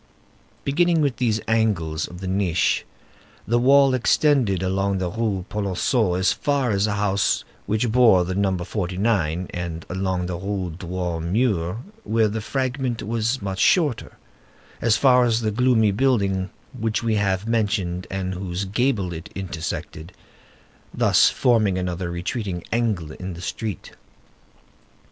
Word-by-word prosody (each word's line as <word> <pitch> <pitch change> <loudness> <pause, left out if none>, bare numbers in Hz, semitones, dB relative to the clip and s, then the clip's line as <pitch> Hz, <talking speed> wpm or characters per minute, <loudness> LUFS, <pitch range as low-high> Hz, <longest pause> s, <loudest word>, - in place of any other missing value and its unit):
Beginning 170 +3 +2
with 140 -4 0
these 115 -4 +1
angles 100 -9 0
of 90 +1 -11
the 95 - -4
niche, 95 -3 +1 0.6
the 120 +2 +2
wall 135 +2 +5
extended 125 - +2
along 95 +1 0
the 90 -2 -2
Rue 105 -4 -2
Polonceau 100 0 0
as 95 +1 +2
far 140 -5 0
as 100 +1 +1
a 105 - -1
house 100 -1 +1 0.2
which 110 +3 0
bore 110 -7 +5
the 95 - -3
number 95 -2 0
49, 95 -3 -1
and 85 -2 -5
along 95 -1 -1
the 90 -1 -3
Rue 95 -3 -3
Droit 90 -2 -3
Mur, 95 +1 0 0.2
where 110 0 +2
the 110 +1 -3
fragment 130 0 -2
was 115 +2 -1
much 95 -1 -3
shorter, 150 - +2 0.6
as 110 -2 +3
far 125 -2 +5
as 115 -1 +1
the 110 -1 0
gloomy 115 -2 +3
building 100 -5 +1 0.3
which 110 +1 -1
we 115 -1 +1
have 100 -1 0
mentioned 100 -6 -1
and 95 -1 -3
whose 90 0 -4
gable 100 -3 0
it 80 0 -8
intersected, 85 -2 -5 0.8
thus - - +4
forming 110 -7 +2
another 90 -1 -3
retreating 90 +1 -4
angle 110 -9 -1
in 90 +2 -7
the - - -10
street. 105 0 -5
100 Hz, 140 wpm, -23 LUFS, 90-115 Hz, 0.8 s, wall